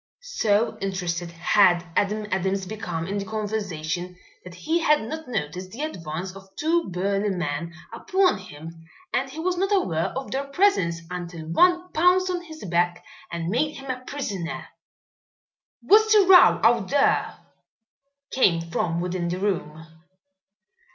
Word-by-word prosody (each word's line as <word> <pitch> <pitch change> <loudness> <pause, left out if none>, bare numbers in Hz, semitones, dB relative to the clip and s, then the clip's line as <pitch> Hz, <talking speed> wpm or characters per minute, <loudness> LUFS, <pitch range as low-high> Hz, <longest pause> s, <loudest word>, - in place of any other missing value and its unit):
So 225 - 0
interested 180 -3 -2
had 175 +1 +3
Adam 210 +1 0
Adams 190 +1 0
become 180 -5 -4
in 200 +3 -3
the - - -3
conversation 185 -5 -4 0.3
that 180 -1 -11
he 320 - 0
had 300 -5 +3
not 315 +5 -6
noticed 185 -5 -4
the 240 +9 -6
advance 180 - -5
of 195 0 -13
two 330 - 0
burly 195 +3 -1
men 170 -2 -3 0.2
upon 375 - +1
him 165 -2 -11 0.3
and 270 +1 0
he 280 - -11
was 360 +2 -1
not 390 +3 0
aware 170 - +1
of 265 - -5
their 275 +1 -2
presence 275 - +1
until 175 -2 -6
one 355 - +3
pounced 365 +3 +3
on 355 -1 -2
his 315 -6 -10
back 175 0 0 0.3
and 170 -1 -3
made 295 +9 0
him 270 -1 -5
a 255 0 -6
prisoner. 200 - -5 1.1
"What's 435 +2 +5
the 415 -2 +6
row 370 -1 +7
out 225 -3 +3
there?" 280 0 +2 0.9
came 170 -9 +2
from 170 0 -1
within 180 -1 -2
the 175 +1 -2
room. 165 -5 -3
195 Hz, 145 wpm, -24 LUFS, 175-290 Hz, 1.1 s, row